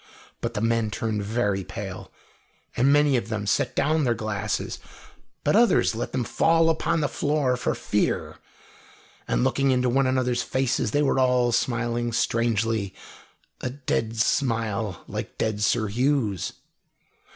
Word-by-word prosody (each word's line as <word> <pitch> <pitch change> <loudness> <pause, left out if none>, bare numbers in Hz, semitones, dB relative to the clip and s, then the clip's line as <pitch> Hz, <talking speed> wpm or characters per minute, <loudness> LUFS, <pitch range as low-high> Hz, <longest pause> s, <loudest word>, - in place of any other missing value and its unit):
But 115 -1 -3
the 105 - -1
men 115 -1 +1
turned 105 +1 -2
very 100 -2 0
pale, - - -7 0.6
and 130 +3 +3
many 145 -2 +4
of 110 -2 -4
them 110 -2 -3
set 100 - 0
down 155 +2 +2
their 120 -3 +1
glasses, 110 -1 -3 0.6
but - - +2
others 235 - +4
let 115 - -4
them 130 - -1
fall 165 +6 +3
upon 160 0 0
the 145 - +1
floor 145 -4 0
for 125 - -1
fear. - - -1 0.9
And - - +1
looking 135 0 +2
into 125 -1 +2
one 135 +2 +2
another's 125 -2 +1
faces, 130 0 0
they 145 0 +1
were 135 -1 +2
all 125 -2 +3
smiling 120 0 0
strangely, 115 -3 0 0.6
a 130 - -3
dead 120 -4 -2
smile, 110 -5 0
like - - -6
dead 110 -2 -1
Sir 110 +1 +2
Hugh's. 115 - 0
120 Hz, 145 wpm, -25 LUFS, 110-130 Hz, 0.9 s, many